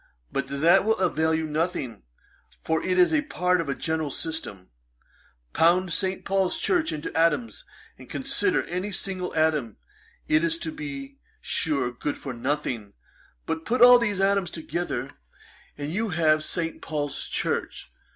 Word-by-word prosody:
But 140 Hz, -1 st, -2 dB
that 160 Hz, +8 st, +4 dB
will 220 Hz, +2 st, +2 dB
avail 160 Hz, -3 st, +1 dB
you 160 Hz, 0 st, -1 dB
nothing, 155 Hz, -, -2 dB, 0.6 s
for 160 Hz, 0 st, 0 dB
it 185 Hz, 0 st, 0 dB
is 180 Hz, -, +5 dB
a 310 Hz, -, +4 dB
part 180 Hz, -, +1 dB
of 155 Hz, -, -5 dB
a 140 Hz, -, 0 dB
general 160 Hz, -2 st, -2 dB
system. 140 Hz, -, -5 dB, 0.8 s
Pound 175 Hz, +2 st, +3 dB
St. 190 Hz, -1 st, -2 dB
Paul's 195 Hz, -2 st, +1 dB
Church 345 Hz, -4 st, +1 dB
into 150 Hz, -, -5 dB
atoms, 150 Hz, -9 st, +1 dB, 0.3 s
and -, -, -13 dB
consider -, -, +1 dB
any 185 Hz, +4 st, -4 dB
single 185 Hz, -1 st, -3 dB
atom; 155 Hz, -7 st, +1 dB, 0.5 s
it 315 Hz, +1 st, +3 dB
is, 335 Hz, 0 st, +1 dB
to 330 Hz, -1 st, -4 dB
be 280 Hz, -3 st, -7 dB, 0.2 s
sure, 140 Hz, -7 st, 0 dB
good 140 Hz, +4 st, -4 dB
for 135 Hz, -, -6 dB
nothing: 120 Hz, -4 st, -3 dB, 0.5 s
but, 160 Hz, 0 st, -3 dB
put 245 Hz, +6 st, +3 dB
all 245 Hz, 0 st, +10 dB
these 210 Hz, -5 st, -1 dB
atoms 195 Hz, -1 st, +2 dB
together, 160 Hz, -5 st, -4 dB, 0.7 s
and 145 Hz, +2 st, -4 dB
you 220 Hz, +3 st, -1 dB
have 155 Hz, -3 st, +3 dB
St. 165 Hz, 0 st, -3 dB
Paul's 145 Hz, -3 st, -3 dB
Church. -, -, -2 dB
165 Hz, 150 wpm, -26 LUFS, 150-195 Hz, 0.8 s, all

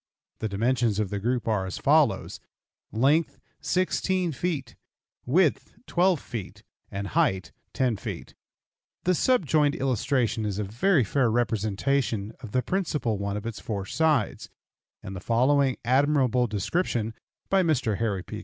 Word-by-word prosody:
The 110 Hz, -, -2 dB
dimensions 115 Hz, +1 st, +1 dB
of 105 Hz, -3 st, -1 dB
the 100 Hz, -, -2 dB
group 120 Hz, +3 st, -1 dB
are 105 Hz, -4 st, 0 dB
as 95 Hz, -, -5 dB
follows: -, -, +2 dB, 0.5 s
Length, 140 Hz, +9 st, +2 dB, 0.2 s
16 185 Hz, -1 st, 0 dB
feet; 150 Hz, -1 st, -3 dB, 0.5 s
width, 160 Hz, +3 st, +2 dB
12 180 Hz, -2 st, +2 dB
feet, 115 Hz, -7 st, -7 dB, 0.3 s
and 100 Hz, 0 st, -4 dB
height, 95 Hz, -1 st, +1 dB, 0.2 s
10 125 Hz, -5 st, +1 dB
feet. -, -, -7 dB, 0.7 s
The 185 Hz, -, +3 dB
subjoined 155 Hz, -, +2 dB
illustration 125 Hz, -3 st, 0 dB
is 105 Hz, -2 st, -2 dB
a 105 Hz, -, -1 dB
very 130 Hz, -, +2 dB
fair 125 Hz, +3 st, +1 dB
representation 110 Hz, 0 st, 0 dB
of 115 Hz, -5 st, -9 dB
the 125 Hz, +2 st, +1 dB
principal 150 Hz, -, -1 dB
one 100 Hz, 0 st, -2 dB
of 105 Hz, -, -7 dB
its 115 Hz, -2 st, -5 dB
four 100 Hz, -4 st, -4 dB
sides, 155 Hz, -2 st, 0 dB, 0.5 s
and 95 Hz, -, -7 dB
the -, -, -5 dB
following 130 Hz, +6 st, +2 dB
admirable 130 Hz, -1 st, +3 dB
description 110 Hz, -, -1 dB, 0.4 s
(by 195 Hz, 0 st, +5 dB
Mr. 130 Hz, -, +1 dB
Harry 105 Hz, -5 st, -1 dB
P. 105 Hz, -, -7 dB
120 Hz, 140 wpm, -26 LUFS, 105-145 Hz, 0.7 s, by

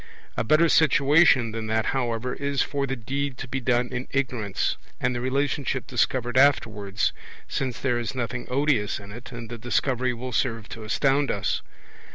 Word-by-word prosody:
A -, -, 0 dB
better 155 Hz, +2 st, +4 dB
situation 145 Hz, -5 st, +5 dB
than 110 Hz, 0 st, -4 dB
that, 110 Hz, 0 st, +1 dB
however, 125 Hz, -1 st, -1 dB
is 140 Hz, -1 st, 0 dB
for 140 Hz, -1 st, -2 dB
the 135 Hz, -, -2 dB
deed 135 Hz, +2 st, -3 dB
to 135 Hz, -, -6 dB
be 130 Hz, +2 st, -2 dB
done 120 Hz, -1 st, +1 dB
in 130 Hz, 0 st, -4 dB
ignorance, 120 Hz, -7 st, -1 dB, 0.2 s
and 125 Hz, +1 st, +1 dB
the 120 Hz, -, -3 dB
relationship 135 Hz, 0 st, -1 dB
discovered 125 Hz, -1 st, +1 dB
afterwards, 105 Hz, -8 st, +2 dB, 0.3 s
since 130 Hz, -4 st, -2 dB
there 125 Hz, -3 st, 0 dB
is 120 Hz, +2 st, -4 dB
nothing 120 Hz, 0 st, -3 dB
odious 130 Hz, -5 st, +1 dB
in 100 Hz, 0 st, -11 dB
it, 120 Hz, +3 st, -10 dB
and 120 Hz, -2 st, -7 dB
the 120 Hz, 0 st, -7 dB
Discovery 125 Hz, +2 st, 0 dB
will 125 Hz, +2 st, -6 dB
serve 115 Hz, -2 st, -1 dB
to 115 Hz, -, -8 dB
astound 135 Hz, +5 st, +2 dB
us. 100 Hz, -2 st, 0 dB
125 Hz, 175 wpm, -25 LUFS, 115-135 Hz, 0.3 s, situation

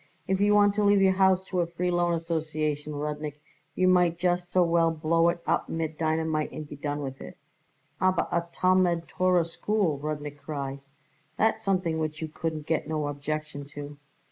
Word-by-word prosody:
If 190 Hz, +1 st, +1 dB
you 205 Hz, 0 st, +4 dB
want 205 Hz, -1 st, +5 dB
to 210 Hz, +1 st, 0 dB
leave 205 Hz, 0 st, +5 dB
your 190 Hz, -1 st, +5 dB
house 190 Hz, 0 st, +3 dB
to 185 Hz, -1 st, -2 dB
a 170 Hz, -, +1 dB
Free 180 Hz, +1 st, -2 dB
Loan 175 Hz, -1 st, +2 dB
Association, 155 Hz, -2 st, -2 dB
Rudnik, 150 Hz, 0 st, -4 dB, 0.4 s
you 185 Hz, -, +3 dB
might 180 Hz, -2 st, +4 dB
just 175 Hz, 0 st, 0 dB
so 180 Hz, 0 st, +4 dB
well 170 Hz, -1 st, +3 dB
blow 165 Hz, +1 st, +2 dB
it 170 Hz, 0 st, -3 dB
up 165 Hz, -, 0 dB
mit 160 Hz, -1 st, -3 dB
dynamite 160 Hz, -1 st, 0 dB
and 155 Hz, -, -7 dB
be 145 Hz, -, -8 dB
done 145 Hz, 0 st, -3 dB
with 135 Hz, 0 st, -6 dB
it." -, -, -10 dB, 0.6 s
"Aber 185 Hz, -1 st, +3 dB
a 170 Hz, 0 st, 0 dB
Talmud 180 Hz, -2 st, +2 dB
Torah 180 Hz, -2 st, +2 dB
School," 170 Hz, -2 st, -1 dB
Rudnik 150 Hz, -1 st, -5 dB
cried; 140 Hz, -2 st, -5 dB, 0.6 s
"that's 220 Hz, +1 st, +2 dB
something 185 Hz, -5 st, 0 dB
which 155 Hz, -1 st, -3 dB
you 160 Hz, -, -4 dB
couldn't 155 Hz, -1 st, -4 dB
got 160 Hz, -1 st, -1 dB
no 155 Hz, -2 st, -1 dB
objection 145 Hz, 0 st, -4 dB
to." 145 Hz, 0 st, -7 dB
165 Hz, 185 wpm, -27 LUFS, 150-180 Hz, 0.6 s, want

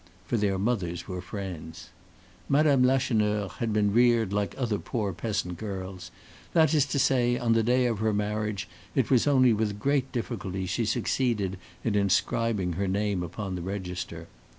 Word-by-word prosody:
For 100 Hz, -, -1 dB
their 100 Hz, -3 st, +1 dB
mothers 95 Hz, -5 st, -1 dB
were 90 Hz, -1 st, -4 dB
friends. 90 Hz, -3 st, -7 dB, 0.6 s
Mme. 140 Hz, -2 st, +4 dB
Lacheneur 105 Hz, -6 st, +2 dB
had 115 Hz, -2 st, -1 dB
been 105 Hz, -1 st, +2 dB
reared 120 Hz, -3 st, +4 dB
like 105 Hz, 0 st, -1 dB
other 115 Hz, -6 st, -1 dB
poor 105 Hz, -5 st, -2 dB
peasant 95 Hz, -3 st, -3 dB
girls; 95 Hz, -4 st, -6 dB, 0.4 s
that 160 Hz, -2 st, +4 dB
is 145 Hz, -2 st, +3 dB
to 140 Hz, -, -2 dB
say, 125 Hz, -2 st, +3 dB
on 120 Hz, -2 st, +2 dB
the 115 Hz, -, +3 dB
day 125 Hz, +3 st, +2 dB
of 115 Hz, -4 st, 0 dB
her 110 Hz, 0 st, +1 dB
marriage 105 Hz, -1 st, -2 dB, 0.3 s
it -, -, +1 dB
was 130 Hz, +1 st, +4 dB
only 130 Hz, -4 st, +5 dB
with 105 Hz, -1 st, -1 dB
great 135 Hz, +3 st, 0 dB
difficulty 95 Hz, -6 st, -3 dB
she 100 Hz, +6 st, -1 dB
succeeded 105 Hz, -4 st, 0 dB, 0.2 s
in 115 Hz, -, 0 dB
inscribing 100 Hz, -1 st, +1 dB
her 100 Hz, +4 st, -1 dB
name 100 Hz, 0 st, 0 dB
upon 95 Hz, +3 st, -5 dB
the 90 Hz, -, -4 dB
register. 90 Hz, -3 st, -5 dB
105 Hz, 165 wpm, -27 LUFS, 95-120 Hz, 0.6 s, only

